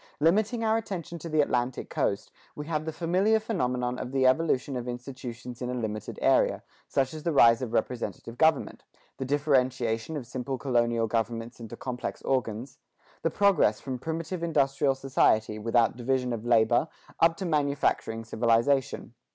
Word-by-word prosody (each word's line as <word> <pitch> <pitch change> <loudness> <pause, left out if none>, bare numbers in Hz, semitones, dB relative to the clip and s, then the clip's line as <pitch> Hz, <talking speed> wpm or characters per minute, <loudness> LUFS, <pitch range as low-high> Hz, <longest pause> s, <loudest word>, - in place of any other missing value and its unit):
Limiting 215 +9 +2
our 220 0 +3
attention 175 -6 -5
to 165 - -7
the 155 -1 +3
Atlantic 125 -2 -1
coast, - - -1 0.2
we 150 - -6
have 155 -1 -2
the 160 - -2
familiar 185 +7 +2
phenomenon 125 - -1
of 125 - -5
the 135 -1 +2
evolution 135 -1 +2
of 125 -1 -4
institutions 125 -1 -7
in 125 - -3
a 125 - -2
limited 110 -3 -4
area, - - +3 0.2
such 135 +1 0
as 155 - -7
the 170 - -1
rise 115 -4 +6
of 125 -3 -3
representative 120 -1 -3
government; 160 0 +2 0.3
the 135 - -3
differentiation 130 -2 0
of 135 - -6
simple 130 +2 -4
colonial 120 -3 +1
governments 115 +1 -3
into 115 0 -8
complex 125 -1 -5
organs; 125 -1 -2 0.4
the - - +1
progress 195 - +3
from 130 -2 -5
primitive 165 +4 -4
industrial 140 -4 +1
society, 110 -5 +2
without 115 +1 +2
division 125 0 -1
of 115 -2 -5
labor, 120 +4 +4 0.3
up 165 0 +4
to 190 - -4
manufacturing 140 -7 0
civilization. 115 +3 +1
130 Hz, 160 wpm, -28 LUFS, 120-155 Hz, 0.4 s, rise